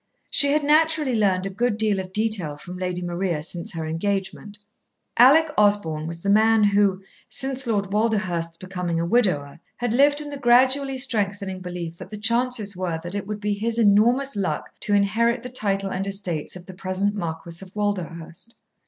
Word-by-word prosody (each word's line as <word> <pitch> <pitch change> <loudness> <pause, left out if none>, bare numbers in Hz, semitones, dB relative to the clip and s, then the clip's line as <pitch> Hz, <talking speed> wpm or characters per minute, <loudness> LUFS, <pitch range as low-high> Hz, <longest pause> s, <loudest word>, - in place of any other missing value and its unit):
She 285 -1 +5
had 300 0 +1
naturally 305 -2 +3
learned 195 -4 +1
a 195 - -3
good 235 +2 0
deal 215 -3 +1
of 185 -1 -6
detail 200 -8 -1
from 180 +4 -9
Lady 180 -1 -3
Maria 175 -3 -2
since 170 +1 -5
her 165 -1 -4
engagement. 195 +5 -3 0.6
Alec 300 +6 +6
Osborn 170 -7 +1
was 165 0 -7
the 200 - -1
man 220 +1 +4
who, 200 -2 +2 0.3
since 265 -1 -1
Lord 200 -4 -1
Walderhurst's 185 -7 -1
becoming 180 -2 -3
a 170 - 0
widower, 170 -9 0 0.2
had 245 -2 -1
lived 285 +3 +4
in 295 -1 -6
the 285 - -6
gradually 265 +2 +4
strengthening 200 -6 -1
belief 175 -2 -6
that - - -10
the 210 - -7
chances 230 -1 0
were 180 -3 -3
that 175 +1 -6
it 200 -1 -4
would 210 0 -4
be 210 0 0
his 225 +3 -2
enormous 235 +5 +3
luck 185 -7 -2
to 205 - +1
inherit 230 +5 +1
the 250 - -6
title 195 -5 0
and 190 +2 -3
estates 190 -6 -3
of 180 -1 -10
the 185 - -10
present 190 +2 -2
Marquis 170 -2 -5
of 185 - -13
Walderhurst. 185 -1 -4
200 Hz, 180 wpm, -23 LUFS, 180-230 Hz, 0.6 s, Alec